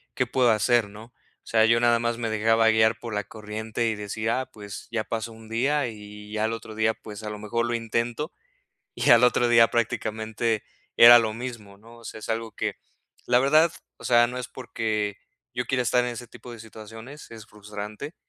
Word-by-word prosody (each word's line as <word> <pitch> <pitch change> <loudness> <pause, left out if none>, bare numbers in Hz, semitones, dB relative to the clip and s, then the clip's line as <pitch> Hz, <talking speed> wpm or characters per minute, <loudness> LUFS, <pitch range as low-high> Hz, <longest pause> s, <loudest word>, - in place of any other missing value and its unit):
qué 125 - +1
puedo 125 -1 +3
hacer, 110 0 +2
¿no?, 110 +4 -13 0.3
o - - -25
sea, 110 -1 +4
yo 115 +1 +4
nada 120 0 +3
más 115 0 -1
me 115 -1 -3
dejaba 115 +1 +2
guiar 110 0 +3
por 115 -2 -7
la 105 - -1
corriente 110 +2 -4
y 110 - 0
decía, 110 +4 -2
ah, 130 - -10
pues 105 -1 -10
ya 110 -2 -2
pasó 115 0 -4
1 110 0 -14
día 135 +5 0
y 105 -1 -10
ya 110 0 -1
el 110 - -1
otro 115 -1 -8
día, 110 0 +2
pues 105 -1 -11
a 105 - -4
lo 105 0 -7
mejor 115 +3 -2
lo 120 - -2
intento, 115 +6 -2 0.6
y - - 0
al 120 +1 +7
otro 120 0 +2
día 115 -1 +6
prácticamente 110 -1 -2 0.3
era 120 +1 +10
lo 110 -2 -1
mismo, 115 -4 -8
¿no?, 115 +3 -16
o 115 - -16
sea, 110 - -8
es - - -8
algo 115 0 -2
que, - - -3 0.5
la 125 - +3
verdad, 155 +5 +4 0.3
o - - -16
sea, 120 -1 +5
no 125 +1 -5
es 125 - -6
porque 110 -5 -3 0.3
yo 125 - -2
quiera 130 -1 0
estar 125 +1 +2
en 125 - -2
ese 120 +1 -7
tipo 120 +2 -12
de 120 - -10
situaciones, 110 +5 -11
es 115 -2 -11
frustrante, 105 +7 -8
115 Hz, 215 wpm, -25 LUFS, 110-120 Hz, 0.6 s, era